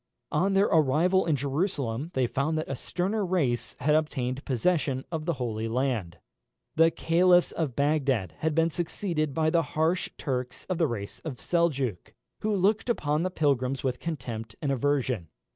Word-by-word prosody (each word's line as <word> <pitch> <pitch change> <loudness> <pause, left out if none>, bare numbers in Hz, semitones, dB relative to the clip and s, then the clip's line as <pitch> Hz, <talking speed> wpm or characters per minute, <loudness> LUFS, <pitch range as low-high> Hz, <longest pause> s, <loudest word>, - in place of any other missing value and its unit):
On 190 +6 +2
their 195 +1 +5
arrival 165 +5 +3
in 155 - +3
Jerusalem 140 - -1
they 130 - +3
found 145 +6 -1
that 155 - -2
a 135 - -3
sterner 195 - -2
race 160 -10 0
had 150 +3 +3
obtained 135 -4 0
possession 135 0 0
of 160 -2 -3
the 170 - +1
Holy 115 -5 -3
Land. 115 -7 -1 0.6
The 165 +1 +6
caliphs 175 +2 +3
of 150 -7 -2
Bagdad 140 - +1
had 155 -1 0
been 165 0 +3
succeeded 160 -3 -2
by 155 -1 +2
the 170 - +4 0.2
harsh 165 +3 +1
Turks 130 -2 -3
of 185 -2 -2
the 165 - +4
race 100 -6 -5
of 150 -6 -6
Seljook, 140 - -1 0.2
who 215 - -1
looked 200 +5 +2
upon 150 -9 +1
the 185 - 0
pilgrims 135 -6 0
with 125 -2 -1
contempt 120 -9 -5
and 140 - -1
aversion. 130 - 0
150 Hz, 165 wpm, -28 LUFS, 130-170 Hz, 0.6 s, The